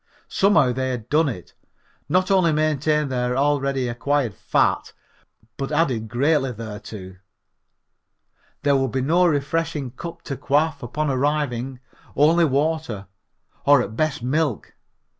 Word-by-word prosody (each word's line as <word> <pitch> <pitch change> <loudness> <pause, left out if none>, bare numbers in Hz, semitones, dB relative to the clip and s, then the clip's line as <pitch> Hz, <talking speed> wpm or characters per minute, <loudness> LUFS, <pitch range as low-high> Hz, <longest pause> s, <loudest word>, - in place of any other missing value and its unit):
Somehow 180 -11 +3
they 130 +1 -2
had 120 -3 -5
done 155 0 +3
it, 90 -9 -8 0.6
not 185 +4 +2
only 185 -4 +4
maintained 150 -1 +1
their 125 0 -1
already 140 -2 +1
acquired 120 0 0
fat - - 0 0.6
but 135 +1 -4
added 135 -8 +1
greatly 135 +3 +1
thereto. 105 -4 -8 1.5
There 145 -1 +3
would 135 -2 +1
be 130 - 0
no 170 +7 +3
refreshing 150 -2 -1
cup 170 +6 -8
to 140 - -4
quaff 145 +1 +1
upon 145 +5 -2
arriving, 135 -2 -1 0.3
only 165 +4 +4
water, 145 -7 -1 0.6
or 145 -1 +6
at 110 0 -7
best 150 -2 -1
milk. 140 -1 -1
140 Hz, 125 wpm, -22 LUFS, 125-155 Hz, 1.5 s, or